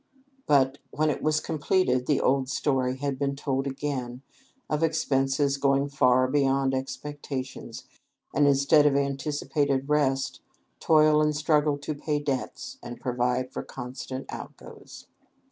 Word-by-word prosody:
But, 135 -1 +3
when 155 0 +1
it - - -4
was 155 0 +2
completed, 145 -6 0
the 145 - +2
old 130 0 +1
story 130 -2 0
had 140 -1 -3
been 140 -1 -1
told 135 -1 -2
again, 135 -2 -4 0.4
of 150 0 -1
expenses 140 -3 +1
going 140 0 +2
far 130 -2 +3
beyond 135 -1 +1
expectations, 135 0 -5 0.5
and, 145 - +4
instead 140 +2 +5
of 140 - +2
anticipated 140 0 -1
rest, 140 -3 0 0.4
toil 155 -1 +4
and 150 0 +1
struggle 150 -1 +2
to 145 +2 -4
pay 150 +1 -2
debts, 140 -3 -4
and 120 - -8
provide 125 +1 -1
for - - -4
constant 130 +1 -7
outgoes. - - -10
140 Hz, 130 wpm, -27 LUFS, 130-150 Hz, 0.5 s, instead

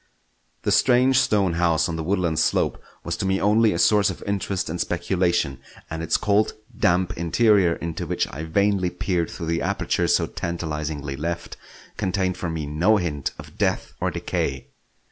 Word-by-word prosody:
The - - +1
strange 130 +1 +4
stone 100 -8 +2
house 85 -1 +2
on 85 - -3
the 80 - -3
woodland 85 -3 0
slope - - +1 0.2
was - - -2
to - - -2
me 95 0 +1
only 110 +2 +4
a 85 - -1
source 105 +3 +4
of 95 - -6
interest 100 -2 -2
and 85 +2 -3
speculation; 85 -5 0 0.3
and 80 0 -3
its 80 0 +1
cold, 105 +1 +2 0.2
damp 90 +1 +1
interior, 90 0 +3
into 85 -1 -5
which - - 0
I 75 +4 -5
vainly 95 +2 +1
peered 90 -1 -1
through 85 - -6
the 85 +1 -1
aperture - - 0
so - - +3
tantalisingly 75 -4 -4
left, 85 +3 -4 0.4
contained 95 -1 0
for 90 - -3
me 80 -2 -3
no 85 +9 +3
hint 75 -7 -2
of - - -12
death - - 0
or - - +1
decay. 65 -1 -3
85 Hz, 170 wpm, -23 LUFS, 80-100 Hz, 0.4 s, strange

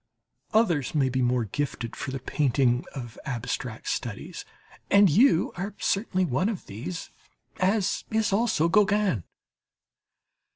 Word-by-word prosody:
Others 170 - +2
may 135 -3 +3
be 130 +1 0
more 125 -1 +1
gifted 120 +1 -3
for - - -5
the 135 - -3
painting 130 -2 +1
of 120 -5 -7
abstract 125 -3 -4
studies, 115 -4 -4 0.4
and 200 -3 +6
you 195 - +4
are 195 +4 -5
certainly 195 -2 0
one 155 - 0
of 210 -6 -5
these, 125 - -6 0.5
as 195 +1 +1
is 220 -2 +1
also 210 -6 +2
Gauguin. 205 - +2
155 Hz, 125 wpm, -26 LUFS, 125-200 Hz, 0.5 s, and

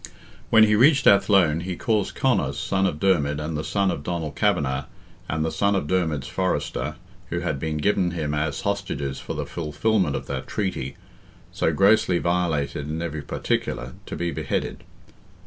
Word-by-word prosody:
When 110 -1 +7
he 105 -1 +4
reached 140 +4 +5
Athlone 100 -6 +5
he 90 +1 -4
caused 110 -1 0
Conor, 120 - +1
son 95 +6 0
of 75 -5 -3
Dermid, 75 -6 +2
and 75 +1 -3
the 75 - -2
son 100 +1 +1
of - - -4
Donald 80 -1 -3
Kavanagh, 65 -2 +1 0.4
and 80 0 0
the 80 - -1
son 100 0 +1
of 95 - 0
Dermid's 80 -6 0
fosterer, 75 -6 -2 0.3
who 85 - -2
had 70 - -2
been 80 +1 -2
given 90 +2 +2
him 80 -4 -3
as 75 -1 -1
hostages 90 -10 -2
for - - -6
the - - -3
fulfilment 90 +6 0
of - - -4
that - - -5
treaty, 90 -10 -3 0.6
so - - +1
grossly 95 +1 +4
violated 80 -5 -1
in 80 +1 -3
every 80 -3 -3
particular, 65 -2 -2
to - - -5
be 85 0 -2
beheaded. - - -3
85 Hz, 170 wpm, -24 LUFS, 75-100 Hz, 0.6 s, When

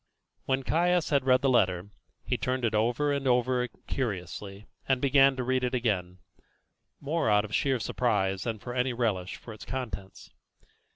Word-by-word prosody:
When 135 0 0
Caius 175 +2 +1
had 140 -3 +2
read 130 0 +5
the - - +3
letter, 95 -5 +2 0.3
he - - 0
turned 130 -1 -1
it 110 - 0
over 120 +7 +1
and 140 -1 -2
over 125 0 +2 0.2
curiously, 100 -3 -4 0.2
and 135 -2 +2
began 135 0 +5
to 130 - -2
read 130 +1 0
it 125 +1 0
again, 95 -7 -1 0.8
more 150 -3 0
out 105 0 +4
of 105 - -10
sheer 135 -3 +1
surprise 95 -6 0
than 115 0 -3
from 120 +5 -7
any 125 0 +1
relish 105 -7 -1
for 115 - -10
its 105 - -11
contents. 100 -8 -6
125 Hz, 170 wpm, -28 LUFS, 105-130 Hz, 0.8 s, read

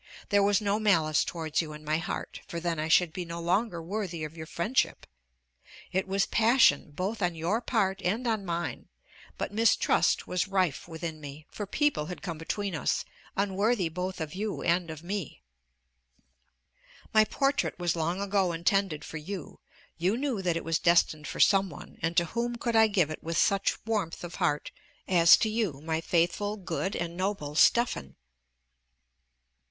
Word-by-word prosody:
There 205 -1 +4
was 200 0 +3
no 205 0 +1
malice 165 -8 +3
towards 160 -2 -2
you 155 -2 -7
in 150 0 -11
my 155 +1 +1
heart, 165 - -5
for 170 - -4
then 170 -2 -2
I 155 - -1
should 165 0 +4
be 180 - -4
no 170 0 -6
longer 175 +1 0
worthy 180 -3 -4
of 155 +1 -6
your 160 -1 -8
friendship. 190 +10 0 0.9
It 190 +1 0
was 195 +1 +1
passion 230 - +4
both 190 +9 -3
on 175 -2 0
your 175 +8 0
part 195 -5 0
and 215 +8 -1
on 220 -3 0
mine; 175 -1 -4 0.5
but - - -3
mistrust 225 +1 +3
was 180 +1 -1
rife 185 -5 0
within 160 -1 -6
me, 145 +1 -9
for 205 - -5
people 290 - 0
had 180 - -7
come 170 -4 -5
between 200 +4 -3
us, 155 - -1 0.3
unworthy 200 0 +1
both 180 +3 -4
of 155 -2 -4
you 210 +2 -3
and 170 0 +1
of 160 0 -8
me. 175 - -5 1.7
My 215 0 +7
portrait 275 +6 0
was 175 -2 0
long 170 +3 -1
ago 195 -3 +1
intended 175 -1 0
for 160 - -6
you; 175 +2 -7 0.4
you 185 +7 +1
knew 260 -6 -1
that 175 -3 0
it - - -4
was 165 -1 +1
destined 170 -3 +3
for - - -6
some 195 -1 +5
one 145 - -12
and 165 +1 -1
to 170 - +5
whom 240 +6 -2
could 235 0 -2
I 220 0 +7
give 180 -7 +1
it 155 - -6
with 165 +1 -3
such 200 +1 +1
warmth 205 -8 -2
of 175 0 -7
heart, 150 -4 0 0.4
as 170 -2 +7
to - - +1
you, 215 -10 -1
my 160 +1 -2
faithful, 175 +6 0
good, 190 +1 -3
and 170 0 -3
noble 185 -6 -2
Stephan? 205 - +3
180 Hz, 175 wpm, -29 LUFS, 165-205 Hz, 1.7 s, My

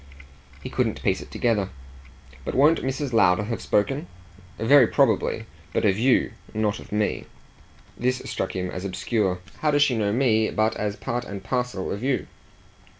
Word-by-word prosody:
He - - -5
couldn't - - -1
piece - - +1
it - - -11
together. 105 -5 0 0.7
"But - - -4
won't 150 +5 +5
Mrs. 135 0 -3
Lowder 90 -3 +4
have 110 -1 -4
spoken?" 135 - 0 0.5
"Very 125 +2 +6
probably. - - +1 0.3
But - - +1
of 100 0 +2
YOU. 125 +2 +3 0.2
Not 105 -1 0
of - - -13
me." 105 0 -1 0.7
This 130 +1 0
struck 95 - -3
him 90 -1 -2
as 90 - -5
obscure. 95 -1 -1 0.2
"How 155 - +1
does 145 -1 +4
she 135 -4 +2
know 105 -2 +1
me 110 -2 +2
but 110 +1 +1
as 105 -1 -2
part 120 +3 -3
and 100 -3 -7
parcel 125 -7 -2
of 100 - -4
you?" 130 -1 0
110 Hz, 165 wpm, -24 LUFS, 100-130 Hz, 0.7 s, Very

